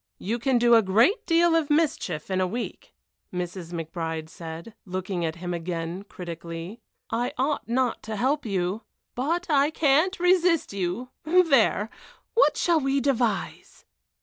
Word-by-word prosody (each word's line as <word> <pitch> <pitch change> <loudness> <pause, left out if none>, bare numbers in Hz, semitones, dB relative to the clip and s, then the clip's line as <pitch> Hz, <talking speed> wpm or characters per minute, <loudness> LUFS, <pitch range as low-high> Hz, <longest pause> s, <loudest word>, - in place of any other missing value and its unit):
"You 225 +5 -3
can 265 +1 +2
do 240 0 +4
a 230 - +8
great 230 - +3
deal 335 0 +4
of 320 -3 +1
mischief 295 - 0
in 185 0 +1
a 185 - +2
week," 235 +6 -6 0.4
Mrs. 180 -1 -5
McBride 160 -1 -4
said, 165 +6 -8
looking 185 -1 -3
at 160 -1 -2
him 175 +1 -5
again 170 +2 -4
critically. 170 +4 -7 0.3
"I 240 +2 -1
ought 275 0 -1
not 250 0 0
to 215 - -2
help 270 +7 +1
you, 195 0 -1 0.3
but 330 +8 -1
I 290 -1 +3
can't 315 +5 +2
resist 355 - +3
you 200 +6 -3
there! 305 - +3 0.4
What 475 - +4
can 330 -4 +3
we 275 +1 +2
devise?" 240 -6 -1
230 Hz, 150 wpm, -26 LUFS, 180-290 Hz, 0.4 s, a